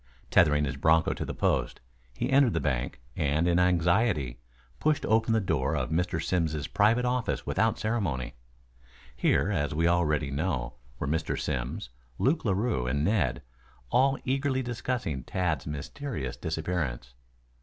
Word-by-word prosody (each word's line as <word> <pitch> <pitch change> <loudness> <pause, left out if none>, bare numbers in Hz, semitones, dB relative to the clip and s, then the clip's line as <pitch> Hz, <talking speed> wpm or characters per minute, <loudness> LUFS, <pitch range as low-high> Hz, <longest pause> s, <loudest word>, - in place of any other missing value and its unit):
Tethering 75 -1 +4
his 70 0 -4
broncho 80 +3 +3
to - - -4
the - - -4
post, - - 0 0.4
he - - -2
entered 135 -4 +5
the - - +1
bank, 65 -5 -2 0.2
and 75 +3 +1
in 85 0 +3
his - - +5
anxiety, 90 - +1 0.4
pushed 155 -1 +1
open 110 +1 +2
the 110 - +4
door 80 -6 0
of 65 -1 -2
Mr. 90 +3 0
Simms' 80 -5 -1
private 115 +8 +2
office 125 -1 -1
without 110 +4 +1
ceremony. 95 - -2 0.8
Here, - - +2
as 75 0 -1
we 85 +2 +2
already 75 -4 +1
know, 70 -4 -2 0.2
were - - -3
Mr. 80 +2 -1
Simms, - - -3 0.3
Luke 150 +5 +1
Larue 100 - 0
and 70 +4 0
Ned, 75 - +1 0.5
all 135 +2 +3
eagerly 135 0 0
discussing 120 - -3
Tad's 80 -4 -1
mysterious 75 - -5
disappearance. 80 -7 -3
85 Hz, 145 wpm, -28 LUFS, 70-110 Hz, 0.8 s, entered